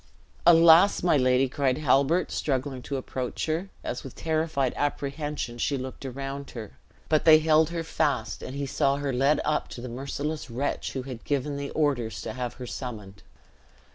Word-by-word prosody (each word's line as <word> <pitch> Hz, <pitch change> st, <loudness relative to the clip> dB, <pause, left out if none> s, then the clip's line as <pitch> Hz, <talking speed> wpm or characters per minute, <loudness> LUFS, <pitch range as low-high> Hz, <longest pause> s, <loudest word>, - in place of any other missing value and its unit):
"Alas! 170 Hz, +3 st, +7 dB
my 175 Hz, -, +4 dB
lady!" 130 Hz, -1 st, +3 dB
cried 130 Hz, 0 st, 0 dB
Halbert, 150 Hz, +4 st, +2 dB
struggling 135 Hz, -2 st, -2 dB
to 140 Hz, +2 st, -4 dB
approach 130 Hz, -1 st, -4 dB
her, 165 Hz, +5 st, -2 dB
as 120 Hz, -, -4 dB
with 135 Hz, -, -9 dB
terrified 155 Hz, -5 st, 0 dB
apprehension 145 Hz, -3 st, -3 dB
she 140 Hz, +4 st, 0 dB
looked 130 Hz, +1 st, -6 dB
around 135 Hz, +2 st, -6 dB
her; 110 Hz, -4 st, -8 dB, 0.4 s
but 155 Hz, -1 st, +2 dB
they 160 Hz, -1 st, +8 dB
held 155 Hz, 0 st, +3 dB
her 170 Hz, -1 st, -3 dB
fast, 140 Hz, -9 st, -1 dB
and 130 Hz, -, -7 dB
he 140 Hz, 0 st, -2 dB
saw 135 Hz, +1 st, +1 dB
her 140 Hz, -2 st, -2 dB
led 135 Hz, +4 st, +3 dB
up 150 Hz, 0 st, 0 dB
to -, -, -9 dB
the 125 Hz, -, -6 dB
merciless 140 Hz, +4 st, -4 dB
wretch 125 Hz, +5 st, -3 dB
who 130 Hz, -, -3 dB
had 125 Hz, -3 st, -8 dB
given 145 Hz, 0 st, -1 dB
the 140 Hz, 0 st, -4 dB
orders 125 Hz, -9 st, 0 dB
to -, -, -5 dB
have 125 Hz, -2 st, -4 dB
her 125 Hz, -, -7 dB
summoned. 105 Hz, -6 st, -7 dB
140 Hz, 175 wpm, -27 LUFS, 125-155 Hz, 0.4 s, they